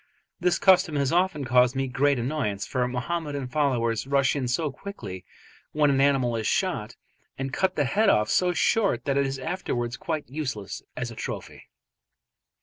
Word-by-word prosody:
This 180 Hz, 0 st, +2 dB
custom 180 Hz, -5 st, +4 dB
has 140 Hz, -1 st, +1 dB
often 175 Hz, -5 st, +1 dB
caused 125 Hz, 0 st, +4 dB
me 135 Hz, 0 st, 0 dB
great 140 Hz, +2 st, +2 dB
annoyance, 120 Hz, -6 st, -2 dB
for 125 Hz, -1 st, -1 dB
Mohammedan 140 Hz, +2 st, -3 dB
followers 125 Hz, -4 st, 0 dB
rush 140 Hz, 0 st, +2 dB
in 135 Hz, -3 st, -1 dB
so 145 Hz, +4 st, 0 dB
quickly 130 Hz, -, -8 dB, 0.5 s
when 150 Hz, -1 st, +3 dB
an 135 Hz, -1 st, +2 dB
animal 135 Hz, -4 st, +2 dB
is 110 Hz, -2 st, -1 dB
shot 135 Hz, -, -1 dB, 0.4 s
and 135 Hz, 0 st, -4 dB
cut 185 Hz, +3 st, +1 dB
the 145 Hz, -, +1 dB
head 210 Hz, +10 st, +2 dB
off 105 Hz, -, +3 dB
so 180 Hz, +10 st, +2 dB
short 205 Hz, +3 st, +1 dB
that 140 Hz, -2 st, 0 dB
it 140 Hz, 0 st, +2 dB
is 135 Hz, 0 st, -3 dB
afterwards 130 Hz, -6 st, -3 dB
quite 165 Hz, -5 st, -3 dB
useless 130 Hz, -8 st, -5 dB, 0.2 s
as 125 Hz, -1 st, -3 dB
a -, -, -10 dB
trophy. -, -, -7 dB
140 Hz, 170 wpm, -26 LUFS, 125-160 Hz, 0.5 s, custom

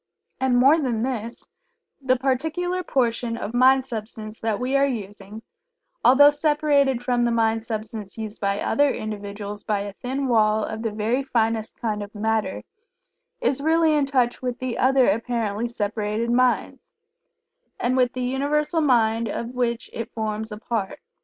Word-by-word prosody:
And 260 Hz, -2 st, +2 dB
more 275 Hz, +6 st, +6 dB
than 240 Hz, -6 st, -1 dB
this, 235 Hz, -3 st, -4 dB, 0.6 s
the 260 Hz, -1 st, +2 dB
particular 320 Hz, +8 st, -1 dB
portion 235 Hz, -6 st, -1 dB
of 225 Hz, -, -5 dB
Mind 260 Hz, +2 st, +5 dB
substance 220 Hz, -2 st, -6 dB
that 220 Hz, -2 st, -1 dB
we 255 Hz, +2 st, -1 dB
are 275 Hz, 0 st, +4 dB
using, 210 Hz, -2 st, -7 dB, 0.6 s
although 285 Hz, +3 st, +7 dB
separated 290 Hz, -4 st, +2 dB
from 245 Hz, -1 st, +1 dB
the 240 Hz, -, +2 dB
Mind 225 Hz, -1 st, +1 dB
substance 215 Hz, -2 st, -6 dB
used 220 Hz, -1 st, -6 dB
by 200 Hz, 0 st, 0 dB
other 285 Hz, +5 st, +2 dB
individuals 205 Hz, -2 st, -5 dB
by 210 Hz, -2 st, -1 dB
a 200 Hz, 0 st, -6 dB
thin 265 Hz, +5 st, -3 dB
wall 215 Hz, -2 st, +3 dB
of 220 Hz, +1 st, -4 dB
the 225 Hz, -1 st, -2 dB
very 220 Hz, +5 st, 0 dB
finest 225 Hz, -4 st, -1 dB
kind 215 Hz, -3 st, -2 dB
of 205 Hz, +1 st, -9 dB
Matter, 220 Hz, +1 st, -1 dB, 0.8 s
is 280 Hz, -, +1 dB
really 320 Hz, +1 st, +3 dB
in 290 Hz, -2 st, +2 dB
touch 250 Hz, -3 st, +1 dB
with 250 Hz, -2 st, -3 dB
the 255 Hz, -2 st, -4 dB
other 260 Hz, 0 st, +4 dB
apparently 230 Hz, 0 st, -1 dB
separated 215 Hz, 0 st, -2 dB
minds, 250 Hz, 0 st, +1 dB, 1.0 s
and 250 Hz, +1 st, +1 dB
with 250 Hz, -1 st, +2 dB
the 255 Hz, -, -3 dB
Universal 295 Hz, +5 st, 0 dB
Mind 230 Hz, -5 st, +2 dB
of 235 Hz, +3 st, -4 dB
which 240 Hz, -2 st, -1 dB
it 230 Hz, +1 st, -5 dB
forms 220 Hz, 0 st, -3 dB
a 210 Hz, -, -6 dB
part. 220 Hz, -3 st, -3 dB
235 Hz, 160 wpm, -23 LUFS, 220-265 Hz, 1.0 s, although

